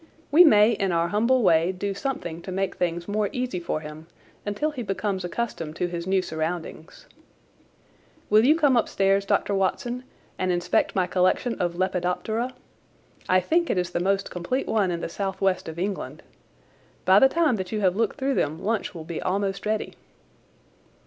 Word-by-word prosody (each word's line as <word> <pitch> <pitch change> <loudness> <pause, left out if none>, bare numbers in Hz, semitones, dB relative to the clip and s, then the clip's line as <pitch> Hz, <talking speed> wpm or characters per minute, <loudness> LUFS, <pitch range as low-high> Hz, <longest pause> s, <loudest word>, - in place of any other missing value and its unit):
We 325 +5 +8
may 215 -8 +6
in 195 -4 0
our 170 0 +1
humble 235 +6 +2
way 170 -1 +4
do 195 +2 -3
something 195 - -4
to 185 - -7
make 195 0 -1
things 170 -1 -2
more 205 0 0
easy 250 -7 -3
for 160 -2 -3
him 155 +1 -10 0.4
until 295 +10 -1
he 275 -5 -6
becomes 195 -2 -2
accustomed 175 -5 -4
to 180 - -1
his 175 0 -5
new 190 -1 +2
surroundings. 160 - -5 1.2
Will 215 +1 +5
you 295 +6 +5
come 290 -5 +3
upstairs, 195 -3 +2
Dr. 200 - +1
Watson, 240 +6 -1 0.4
and 185 0 +1
inspect 175 0 0
my 185 -2 +2
collection 185 +7 +1
of 175 -1 -1
Lepidoptera? 190 +7 -1 0.7
I 185 0 +4
think 335 - +1
it - - +1
is 180 -1 -1
the - - -1
most 195 +2 0
complete 180 +10 -2
one 205 -4 +1
in 170 -1 -3
the - - -3
south 190 +3 -4
west 185 -3 0
of 160 - -8
England. 195 +2 -4 0.8
By 190 +2 +7
the 265 - +6
time 315 -6 +2
that 185 -2 -5
you 215 -1 -2
have 185 -2 +2
looked 225 +4 0
through 275 -1 0
them 155 - 0
lunch 215 -1 -2
will 160 -2 -7
be 170 -1 -5
almost 195 +2 -2
ready." 215 0 -1
195 Hz, 180 wpm, -25 LUFS, 175-220 Hz, 1.2 s, We